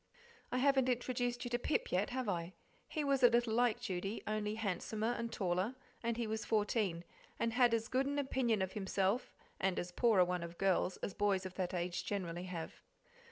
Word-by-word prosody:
I 250 - 0
haven't 265 -1 +4
introduced 245 0 -1
you - - -2
to 240 - +1
Pip 290 - 0
yet, 185 +3 +1
have 255 -1 -2
I? 175 -2 -2 0.3
He 310 - -2
was 275 -2 +2
a 245 - +8
little 235 -1 +2
like 240 0 +3
Judy, 195 -2 -3
only 215 0 -1
handsomer 220 +2 -1
and 235 -1 -3
taller, 185 +5 0 0.3
and 235 0 -1
he 235 - 0
was 220 0 -2
fourteen, 210 -5 +1 0.3
and 230 -1 0
had 245 -1 +5
as 225 -1 +1
good 265 +2 +1
an 285 +1 -1
opinion 250 -7 +1
of 190 - -3
himself 195 +2 0 0.2
and 190 -1 +1
as 175 0 -3
poor 230 +2 +3
a 180 - +7
one 180 0 -1
of 170 0 -7
girls 190 -1 +2
as 195 - -2
boys 200 -2 +1
of 185 - -5
that 185 -1 -2
age 175 0 -2
generally 180 -3 -3
have. 170 -3 -6
215 Hz, 205 wpm, -36 LUFS, 185-245 Hz, 0.3 s, a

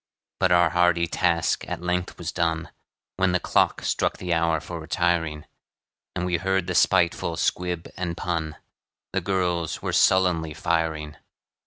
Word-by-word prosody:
But 95 - +2
our 85 -1 +5
hearty 90 -1 +3
task 85 -1 0
at - - -4
length 90 0 -2
was - - -4
done, 80 -2 -1 0.5
When 95 -1 +2
the 90 - +2
clock - - +1
struck - - 0
the 90 -1 -2
hour 80 -1 +2
for 85 +1 -7
retiring; 80 -2 -1 0.7
And 90 -1 -1
we 90 -1 +1
heard 95 +1 0
the 90 - -3
spiteful - - +2
squib 90 -2 -1
and 85 -2 -4
pun 80 -3 -2 0.6
The - - 0
girls 90 -4 -1
were - - -2
sullenly 85 -5 +3
firing. 80 -2 -1
85 Hz, 150 wpm, -25 LUFS, 80-90 Hz, 0.7 s, our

